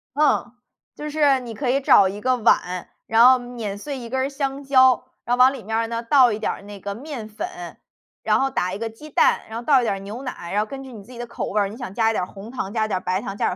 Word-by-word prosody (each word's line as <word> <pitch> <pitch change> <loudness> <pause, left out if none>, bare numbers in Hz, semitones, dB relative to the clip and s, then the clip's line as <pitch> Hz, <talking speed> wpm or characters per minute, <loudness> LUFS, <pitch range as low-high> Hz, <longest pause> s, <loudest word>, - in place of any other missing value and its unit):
嗯， 295 -4 +2 0.4
就 300 0 -6
是 290 -3 +3
你 240 -2 -8
可 260 +2 -2
以 275 +2 +1
找 200 -7 +6
1 200 +2 -6
个 255 +1 +2
碗， 185 -6 +1 0.2
然 225 +2 +6
后 255 0 +7
碾 240 -5 -6
碎 280 +6 -6
1 235 -2 -8
根 265 +2 -1
儿 270 - -1
香 275 0 -3
蕉， 260 -2 +4 0.2
然 245 - +1
后 - - -9
往 255 +1 +7
里 265 -5 -8
面 220 +3 -3
儿 225 0 0
呢， 230 0 -4
倒 250 0 +5
一 210 - -2
点 220 - -1
儿 - - -8
那 200 0 -10
个 200 +1 -5
面 250 -1 -7
粉， 355 - -7 0.4
然 - - +2
后 270 - +1
打 185 -7 -1
1 - - -3
个 225 +1 -4
鸡 300 +8 -13
蛋， - - +3
然 220 - -5
后 235 - -7
倒 275 -4 +5
一 - - -2
点 220 - 0
儿 - - -7
牛 205 +5 -7
奶， 250 -10 -7
然 205 - +2
后 215 - -3
根 270 -1 -7
据 260 -2 -11
你 210 -3 -10
自 230 - -16
己 245 - -11
的 240 - -5
口 235 - -5
味 210 - 0
儿， 200 - +2
你 205 - -9
想 240 -6 -6
加 225 -1 +3
一 - - -2
点 200 - -1
儿 - - -4
红 200 +4 -11
糖、 250 -6 -4
加 220 0 0
一 - - -3
点 205 - -1
儿 - - -17
白 185 +2 -1
糖、 195 - -6
加 - - 0
点 - - +1
235 Hz, 325 characters per minute, -22 LUFS, 210-265 Hz, 0.4 s, 后